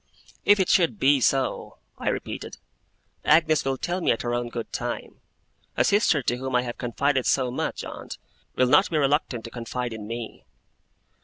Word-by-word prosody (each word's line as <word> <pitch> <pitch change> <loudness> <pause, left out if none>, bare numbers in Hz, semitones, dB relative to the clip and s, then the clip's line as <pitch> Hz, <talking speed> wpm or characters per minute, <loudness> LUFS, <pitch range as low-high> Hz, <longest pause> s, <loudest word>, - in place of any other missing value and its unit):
'If 205 0 +6
it 190 - +2
should 180 +3 +3
be 140 -5 +4
so,' 135 +1 0 0.2
I - - 0
repeated, - - -5 0.7
'Agnes 155 0 +4
will 135 0 -1
tell 175 +7 -2
me - - 0
at 115 - +1
her 120 0 -1
own 120 0 -2
good 115 -1 -6
time. - - -5 0.6
A - - +4
sister 200 - +3
to 120 - 0
whom 130 0 -3
I 125 - +3
have 120 -1 -6
confided 130 +2 0
so 130 -2 +2
much, 125 - -3
aunt, - - -8 0.4
will 130 - +3
not 150 +9 +4
be 160 - 0
reluctant 140 -5 +1
to 115 - -8
confide 120 0 -4
in 105 -2 -7
me. 115 0 -6
130 Hz, 180 wpm, -25 LUFS, 120-150 Hz, 0.7 s, If